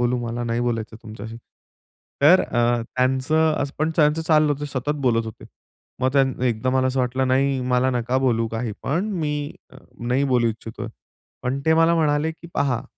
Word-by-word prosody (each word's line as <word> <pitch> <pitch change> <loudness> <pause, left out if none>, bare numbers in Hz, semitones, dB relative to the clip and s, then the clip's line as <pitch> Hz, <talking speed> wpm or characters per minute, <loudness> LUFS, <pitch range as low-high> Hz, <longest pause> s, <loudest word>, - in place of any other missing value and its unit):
बोलू, 125 0 +1
मला 120 +1 -3
नाही 115 0 -1
बोलायचं 115 -2 -2
तुमच्याशी." 110 +1 -8 0.9
तर 175 +6 +7
अ, 120 0 +1
त्यांचं 130 +6 +1
असं 140 0 -4
पण 155 +1 +1
त्यांचं 155 +1 +3
चाललं 155 -2 +3
होतं 145 +1 -5
सतत 140 +1 -2
बोलत 115 -1 +2
होते. 110 - -9 0.6
मग 130 0 +1
त्यां 135 -1 +4 0.2
एकदा 120 +2 0
मला 130 0 +2
असं 130 0 0
वाटलं, 130 +1 0
"नाही, 135 0 +2
मला 125 +1 +3
नका 125 +1 0
बोलू 115 -4 +1
काहीपण, 130 - -2
मी 150 -1 -2 0.5
नाही 125 +4 0
बोलू 120 -1 +3
इच्छितोय." 110 0 -6 0.5
पण 130 +2 -2
ते 160 - +5
मला 165 +1 +4
म्हणाले 150 0 +1
की 170 +1 -14
पहा 130 -2 0
130 Hz, 170 wpm, -22 LUFS, 120-150 Hz, 0.9 s, तर